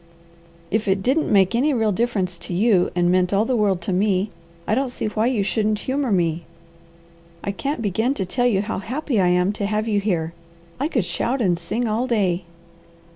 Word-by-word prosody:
"If 215 +1 0
it 190 0 +1
didn't 285 +7 +1
make 195 0 +4
any 270 +5 +2
real 220 -3 +2
difference 195 -5 -1
to 170 +1 -5
you, 195 -2 +3
and 175 0 +2
meant 180 0 +2
all 200 +2 +2
the 255 - 0
world 195 -5 +1
to 190 - -1
me, 195 +1 +1 0.3
I - - 0
don't 265 +3 +1
see 245 - -4
why 215 +2 0
you 240 -6 +1
shouldn't 215 +1 0
humour 265 -2 -1
me. 170 -3 +1 1.0
I 200 - -1
can't 275 +5 -3
begin 220 +7 0
to 190 - -2
tell 245 +7 +1
you 200 -5 +2
how 210 -3 -3
happy 250 +3 -2
I 185 - +3
am 180 +2 +2
to 205 -1 -2
have 215 +1 -1
you 210 -2 +2
here. 170 -5 -1 0.5
I 285 - +1
could 240 - 0
shout 250 +8 -1
and 185 -7 +2
sing 225 +8 -2
all 225 +4 0
day." 190 -7 0
210 Hz, 205 wpm, -22 LUFS, 185-235 Hz, 1.0 s, make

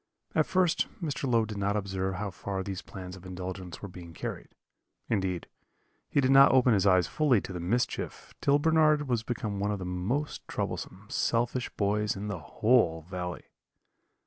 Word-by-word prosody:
At - - +2
first 185 -3 +2
Mr. 145 -5 -2
Low 115 -2 +4
did 105 -2 -6
not 100 +1 +1
observe 95 -1 -2
how 100 +1 -3
far 95 +2 -4
these 95 -1 -4
plans 90 -1 -8
of 95 - -13
indulgence 90 0 -6
were - - -3
being 90 -2 -10
carried; - - -6 0.5
indeed, 95 -5 0 0.6
he - - +2
did 130 -1 +3
not 135 +1 +8
open 130 -2 +5
his 100 -1 +3
eyes 95 -2 +5
fully 140 - +3
to 95 - -7
the 90 - -4
mischief 115 +9 -2
till 140 +1 +4
Bernard 155 -1 +3
was 120 -3 +1
become 110 -4 -3
one 100 +1 0
of 105 - -1
the 95 - -5
most 95 +12 -2
troublesome, 95 +3 -4
selfish 120 +2 0
boys 105 +1 +1
in 100 +2 -4
the 95 -4 -3
whole 85 - +2
valley. 90 0 -5
100 Hz, 175 wpm, -29 LUFS, 90-125 Hz, 0.6 s, not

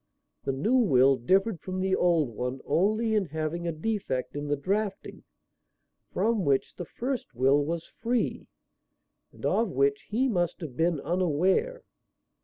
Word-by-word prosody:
The - - +1
new 185 - +1
will 135 - +5
differed 190 - +1
from 185 0 -4
the 190 0 +1
old 170 -6 +2
one 125 +3 -4
only 215 +8 +1
in 210 -3 +2
having 160 +2 -3
a - - 0
defect 160 - -3
in 145 0 -4
the 145 - +1
drafting 195 +7 -3 0.9
from 225 -3 +1
which 140 -3 +1
the 175 - -6
first 245 - -4
will 135 +4 +3
was 165 +2 -3
free, 240 +1 -2 0.8
and - - -9
of 225 -2 +2
which 140 -2 0
he 245 +5 +1
must 175 -8 0
have 150 -7 -7
been 165 +1 +1
unaware. 185 - +1
175 Hz, 150 wpm, -28 LUFS, 145-215 Hz, 0.9 s, will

